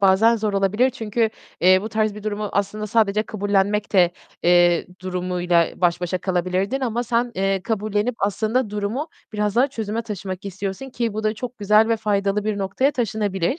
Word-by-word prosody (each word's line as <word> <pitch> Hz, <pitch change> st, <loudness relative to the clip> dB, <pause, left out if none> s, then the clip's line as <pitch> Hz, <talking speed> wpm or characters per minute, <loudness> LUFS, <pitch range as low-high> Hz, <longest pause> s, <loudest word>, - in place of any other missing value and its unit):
bazen 200 Hz, +4 st, +5 dB
zor 210 Hz, -1 st, -1 dB
olabilir. 205 Hz, +6 st, +2 dB
Çünkü, 225 Hz, -1 st, -1 dB, 0.3 s
eee, 185 Hz, +2 st, +6 dB
bu 215 Hz, -, -4 dB
tarz 215 Hz, -1 st, 0 dB
bir 210 Hz, -, -9 dB
durumu 210 Hz, -1 st, -3 dB
aslında 205 Hz, +1 st, -1 dB
sadece 215 Hz, -1 st, +2 dB
kabullenmek 205 Hz, 0 st, 0 dB
de, 180 Hz, -3 st, +5 dB, 0.3 s
eee, 175 Hz, -1 st, +4 dB, 0.2 s
durumuyla 180 Hz, -2 st, +1 dB
baş 175 Hz, -1 st, +1 dB
başa 180 Hz, +1 st, -1 dB
kalabilirdin 185 Hz, +7 st, -1 dB
ama 240 Hz, -2 st, -1 dB
sen, 240 Hz, 0 st, 0 dB
eee, 195 Hz, 0 st, 0 dB
kabullenip 215 Hz, +2 st, -1 dB
aslında 215 Hz, +4 st, 0 dB
durumu 210 Hz, +9 st, -3 dB, 0.2 s
biraz 210 Hz, 0 st, -1 dB
daha 265 Hz, +3 st, +4 dB
çözüme 225 Hz, -4 st, -3 dB
taşımak 195 Hz, -3 st, -6 dB
istiyorsun 195 Hz, +6 st, -5 dB
ki 235 Hz, -3 st, -2 dB
bu 215 Hz, +1 st, -3 dB
da 215 Hz, -, +1 dB
çok 245 Hz, +2 st, -7 dB
güzel 210 Hz, +2 st, +4 dB
ve 230 Hz, -, +2 dB
faydalı 205 Hz, -1 st, 0 dB
bir 215 Hz, -2 st, -1 dB
noktaya 195 Hz, +9 st, +1 dB
taşınabilir. 210 Hz, -, -1 dB
210 Hz, 170 wpm, -22 LUFS, 190-225 Hz, 0.3 s, eee